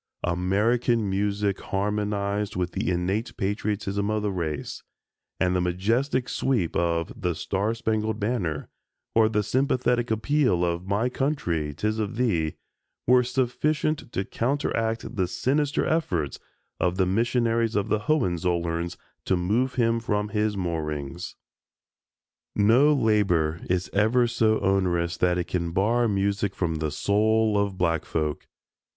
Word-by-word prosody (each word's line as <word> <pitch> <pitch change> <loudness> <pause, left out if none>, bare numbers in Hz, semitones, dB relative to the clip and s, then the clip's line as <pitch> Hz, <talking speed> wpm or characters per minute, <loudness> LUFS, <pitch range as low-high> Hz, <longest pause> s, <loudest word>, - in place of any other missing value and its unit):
American 105 +6 +1
music 100 0 0
harmonized 105 0 -1
with 90 -1 -1
the - - -2
innate 95 +6 -1
patriotism 100 -1 -1
of 110 -1 0
the 105 - 0
race, 80 -5 -4 0.6
and 90 0 +2
the 90 - +2
majestic 115 +9 0
sweep 115 -14 0
of 85 -1 0
"The 90 -2 0
Star 100 +7 -1
Spangled 110 -1 -1
Banner" 100 -9 -2 0.5
or 110 -1 +4
the 105 -1 +1
sympathetic 125 +1 +1
appeal 110 - +2
of 85 +1 -2
"My 105 +5 +1
Country, 125 - -1
'Tis 110 +6 -1
of 110 +2 -2
Thee," 90 -11 0 0.5
were 125 +1 +6
sufficient 130 +3 -1
to 95 - -2
counteract 115 -3 -1
the 95 -2 +1
sinister 145 - 0
efforts 90 - -1 0.4
of 90 0 +1
the 95 - +3
missionaries 115 +3 +1
of 105 +1 0
the 110 - +2
Hohenzollerns 85 - 0 0.3
to 95 - +2
move 115 +9 0
him 115 -2 +2
from 105 -2 -1
his 105 -1 0
moorings. 80 -2 -4 1.2
No 115 +8 +5
labor 95 - +2
is 90 0 0
ever 110 +5 +3
so 110 -2 +2
onerous 90 -3 +1
that 90 0 +2
it 90 - -1
can 85 -2 -2
bar 115 +6 +2
music 100 -1 0
from 80 -3 -1
the 80 0 -1
soul 110 +6 +2
of 100 -2 0
black 85 -3 +1
folk. 75 -2 -3
105 Hz, 135 wpm, -26 LUFS, 90-115 Hz, 1.2 s, were